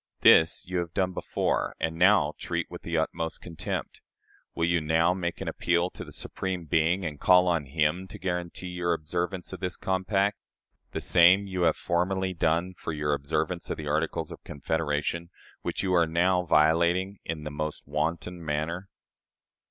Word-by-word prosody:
This 80 0 +6
you 90 0 -2
have 85 -1 -5
done 95 -1 +1
before, - - -1
and 80 0 -1
now 90 -4 +4
treat - - -3
with - - -8
the 85 -1 -2
utmost 80 +1 -2
contempt. 85 -2 -5 0.5
Will 85 - +1
you 85 0 +2
now 80 +3 +3
make 85 -2 -3
an - - -4
appeal 90 +1 +1
to - - -8
the - - -11
Supreme 95 -3 -3
Being, 80 +4 +1
and 75 -3 -4
call 90 0 +5
on 85 -4 +1
Him 80 +6 0
to 100 +4 -10
guarantee 90 -1 -4
your 90 -1 0
observance 90 +3 -3
of - - -6
this 90 -2 -2
compact? 95 +2 0 0.5
The - - -4
same 90 +3 +6
you 95 -2 -3
have - - -3
formerly 95 +2 0
done 85 +2 0
for 90 - -6
your 75 -1 0
observance 70 0 -2
of - - -2
the 75 - -6
Articles 80 +2 -1
of - - -10
Confederation, 80 +2 -2 0.3
which - - -3
you 95 -1 +1
are 85 -2 +4
now 90 +2 +2
violating 85 +5 +3
in 80 -2 -4
the 75 - -5
most 75 +1 -3
wanton 85 +4 -2
manner." 80 +5 -3
85 Hz, 175 wpm, -27 LUFS, 80-90 Hz, 0.5 s, This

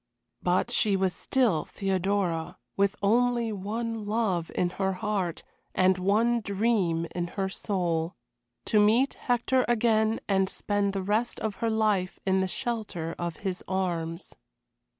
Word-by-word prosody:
But 180 +7 +1
she 210 -4 +3
was 190 -1 +1
still 220 - +1
Theodora, 190 -3 -1 0.2
with 200 +1 +2
only 235 +2 +2
one 215 +2 -3
love 205 -6 0
in 175 -1 +1
her 190 0 +2
heart 185 -3 -2 0.3
and 185 0 +3
one 220 +6 +2
dream 200 -5 +1
in 175 -1 -2
her 195 -1 +1
soul 175 -4 -1 0.5
to 215 - +3
meet 225 +6 +4
Hector 250 +1 +1
again 220 -2 +2
and 195 -1 +2
spend 205 -1 -1
the 195 -1 -2
rest 215 +5 0
of 215 -2 -2
her 230 - 0
life 215 -4 +1
in 190 0 +3
the 190 - +1
shelter 185 -5 -3
of 170 -1 -3
his 185 -1 -2
arms. 175 -2 -2
200 Hz, 140 wpm, -28 LUFS, 185-220 Hz, 0.5 s, meet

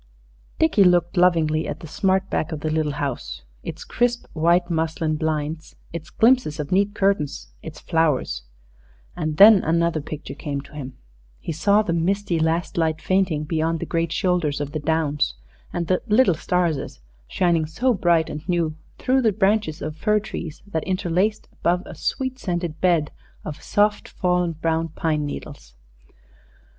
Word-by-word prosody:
Dickie 315 -11 +4
looked 175 -1 +3
lovingly 165 -4 +3
at - - -5
the - - -8
smart 190 +4 +1
back 160 - -1
of 155 -2 -4
the 155 - -1
little 155 -2 0
house 140 -3 -4 0.2
its - - -7
crisp 240 0 0
white 170 +2 +3
muslin 160 -2 -1
blinds, 155 0 -3 0.2
its 165 -2 -6
glimpses 230 - +3
of 145 -1 -4
neat 200 +2 +2
curtains, 150 - 0
its - - -9
flowers; 150 - 0 0.7
and 155 -1 -3
then 205 0 +9
another 165 -1 +1
picture 155 +1 -7
came 145 -2 -4
to 140 - -17
him 135 -3 -7 0.4
he - - -5
saw 200 +7 +3
the 170 - -1
misty 180 +1 0
last 165 +2 0
light 160 -1 +1
fainting 185 -5 +1
beyond 160 +1 -1
the - - -3
great 165 -1 -1
shoulders 175 -6 0
of 145 -1 -3
the 155 - -3
downs, 150 -1 0 0.4
and 175 -1 -2
the 185 +2 +1
"little 215 -2 +4
starses" 165 - -1 0.3
shining 170 - +1
so 245 +11 +1
bright 170 -5 +2
and 155 +5 -7
new 170 -3 0 0.2
through 265 +1 +2
the 225 -3 +3
branches 200 -4 +1
of 155 0 -4
fir 210 +5 +2
trees 170 -6 -7
that 160 -6 -3
interlaced 185 +3 0
above, 180 +1 0
a - - -9
sweet 260 -1 -3
scented 175 -5 -3
bed 170 -5 +2 0.3
of 150 - -6
soft 210 0 +1
fallen 180 -2 0
brown 160 +1 -1
pine 155 -2 -1
needles. 140 - -8
165 Hz, 160 wpm, -23 LUFS, 155-190 Hz, 0.7 s, then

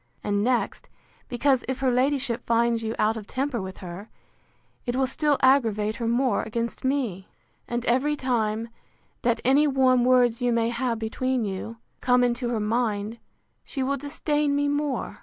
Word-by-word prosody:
And 205 0 0
next, 245 +1 -1 0.4
because, 255 +1 +2
if 260 0 -2
her 265 -2 +1
ladyship 255 -1 +1
finds 235 0 +2
you 225 0 -3
out 220 +1 +2
of 210 -2 -8
temper 265 -3 -2
with 190 0 -7
her, 180 +5 -8 0.8
it 240 - -1
will 265 0 +2
still 290 +2 +1
aggravate 225 -5 +3
her 235 - -2
more 245 +2 +2
against 230 +1 -4
me; 250 -9 -1 0.4
and 240 0 -3
every 265 +5 +2
time 230 -4 -1 0.5
that 235 -1 +1
any 280 +4 +5
warm 260 -3 +3
words 245 -2 +3
you 245 0 +2
may 230 0 +1
have 235 0 -1
between 240 +2 -1
you, 200 +4 -5 0.2
come 250 0 +4
into 245 0 0
her 235 -2 -1
mind, 215 0 -1 0.4
she 270 - -4
will 280 +2 0
disdain 290 +1 -1
me 285 0 +1
more. 290 -1 -2
245 Hz, 165 wpm, -25 LUFS, 225-265 Hz, 0.8 s, any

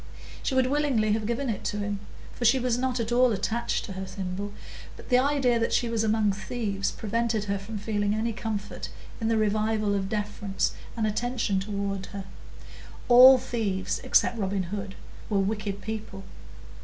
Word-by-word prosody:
She 265 - -1
would 260 -1 +4
willingly 260 -6 +1
have 215 0 0
given 235 +4 -1
it 220 -5 -2
to 205 - -1
him, 205 -1 -2 0.3
for - - -6
she 240 +3 +5
was 250 -2 +1
not 255 0 -1
at 230 0 -2
all 250 0 +5
attached 225 +3 -1
to 195 - -7
her 190 0 -5
thimble; 190 +1 -4 0.5
but - - -13
the 250 -1 +5
idea 265 -3 +2
that 230 - 0
she 240 - +2
was 225 -1 0
among 215 -1 +2
thieves 200 0 -2
prevented 225 0 -1
her 200 -1 -2
from 210 +2 -6
feeling 205 0 0
any 225 +1 -1
comfort 210 -2 -4 0.3
in 225 - -1
the 225 0 +2
revival 215 0 +1
of 195 -1 -1
deference 205 -1 -1 0.3
and 220 - +1
attention 220 -2 0
toward 200 -1 -3
her; 200 -2 -7 0.8
all 255 +2 +10
thieves, 215 -7 -2
except 235 - +3
Robin 195 -1 0
Hood, 195 -1 -5 0.3
were 210 - +1
wicked 200 0 -1
people. 215 -3 -5
215 Hz, 175 wpm, -27 LUFS, 200-235 Hz, 0.8 s, all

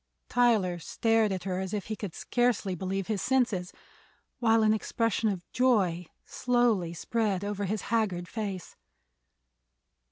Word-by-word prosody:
Tyler 215 -8 +2
stared 225 +4 +1
at 185 -2 -3
her 185 -1 -2
as 190 +2 -3
if 200 - -3
he 215 - -4
could 200 -5 -6
scarcely 240 -6 0
believe 190 +2 -3
his 210 -1 -2
senses, 235 -9 +1 0.7
while 225 -2 +4
an 215 0 +4
expression 225 0 0
of 185 -4 -4
joy 195 -9 +2 0.2
slowly 240 -8 +1
spread 200 +2 -1
over 205 0 -2
his 210 +2 -2
haggard 190 -6 0
face. 200 -5 -5
205 Hz, 135 wpm, -29 LUFS, 185-230 Hz, 0.7 s, while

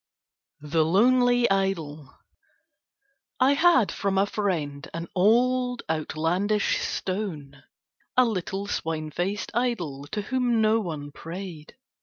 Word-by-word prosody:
THE 155 +2 +1
LONELY 245 +7 +4
IDOL 165 -7 -1 1.3
I 265 +2 +5
had 320 - +4
from 195 -1 -1
a 195 - +4
friend 165 -8 -3
an 165 0 -4
old 245 +5 +2
outlandish 165 +6 0
stone, 160 -8 -4 0.6
a 255 - +6
little 195 -2 -3
swine 160 -5 -3
faced 195 +6 -3
idol 175 - -2
to 210 +6 -4
whom 245 0 +1
no 220 +1 +3
one 155 -7 -5
prayed. 165 0 -8
195 Hz, 110 wpm, -26 LUFS, 160-230 Hz, 1.3 s, a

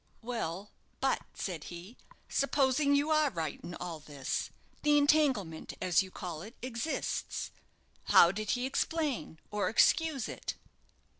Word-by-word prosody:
"Well, 205 -5 -3 0.3
but," 270 - +1
said 170 -6 -4
he, 175 +7 -9 0.3
"supposing 280 +1 +2
you 290 +2 +2
are 305 -1 +4
right 160 - -4
in 175 - -6
all 170 -3 -5
this, 145 -3 -3 0.3
the 295 0 +4
'entanglement,' 280 - +2
as 180 0 +3
you 190 - -6
call 175 -4 -6
it, 220 +6 -10
exists. 255 +4 -3 0.5
How 170 - +7
did 210 +1 -4
he 245 - -1
explain, 285 - -1
or 210 -1 0
excuse 310 +2 +3
it?" - - -5
230 Hz, 135 wpm, -32 LUFS, 175-285 Hz, 0.5 s, How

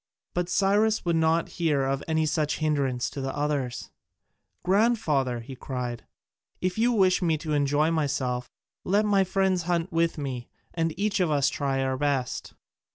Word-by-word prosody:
But 175 0 -1
Cyrus 205 +4 +2
would 170 -1 +2
not 160 +1 +2
hear 150 -5 +2
of 135 0 -1
any 160 -1 +1
such 155 -1 0
hindrance 140 -5 0
to 140 - -5
the 135 0 -3
others: 145 -4 -2 0.7
"Grandfather," 180 - +2
he 130 +3 -9
cried, 125 -2 -5 0.5
"if 185 0 -1
you 240 +2 +4
wish 190 -5 +3
me 165 -3 +2
to 155 0 -4
enjoy 145 +2 +2
myself, 130 -5 -1 0.3
let 205 +3 +2
my 200 -2 +4
friends 190 -1 +1
hunt 175 +1 0
with 165 0 +1
me 130 -5 -5 0.2
and 165 -1 0
each 210 0 +1
of 180 -3 +2
us 140 -2 +3
try 135 -2 -1
our 130 0 -1
best." 140 -4 -1
155 Hz, 160 wpm, -26 LUFS, 135-180 Hz, 0.7 s, you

